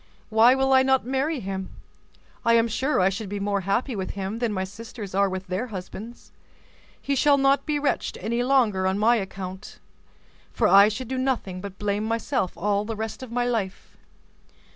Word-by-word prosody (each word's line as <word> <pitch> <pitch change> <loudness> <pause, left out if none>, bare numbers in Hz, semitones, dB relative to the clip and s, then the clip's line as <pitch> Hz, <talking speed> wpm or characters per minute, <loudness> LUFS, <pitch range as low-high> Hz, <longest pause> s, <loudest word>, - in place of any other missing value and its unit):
Why 230 +3 +6
will 270 0 +2
I 260 - +7
not 265 -1 +2
marry 270 +3 -1
him? 190 -1 -4 0.7
I 230 0 +4
am 230 0 +4
sure 260 +6 0
I 185 +1 +4
should 200 +1 -5
be 205 0 -4
more 200 0 -1
happy 220 +7 -1
with 190 -1 -4
him 195 +3 -3
than 235 -2 0
my 190 -2 -1
sisters 205 +1 -8
are 200 +1 +3
with 190 0 -5
their 190 +7 -3
husbands. 215 +3 -9 0.7
He 280 - -2
shall 285 +1 +4
not 275 +2 +2
be 300 -1 +1
wretched 290 -1 -1
any 235 +2 -2
longer 240 -8 +2
on 190 +1 0
my 230 +3 +4
account; 190 -1 -6 0.7
for - - +2
I 200 +1 +8
should 225 +4 -4
do 260 +1 -3
nothing 235 -9 -2
but 195 -1 -8
blame 205 +1 -1
myself 230 -2 -1
all 205 +2 0
the 225 +1 -4
rest 220 +3 -5
of 260 -3 -8
my 245 0 0
life." 220 -6 -3
220 Hz, 190 wpm, -25 LUFS, 195-255 Hz, 0.7 s, I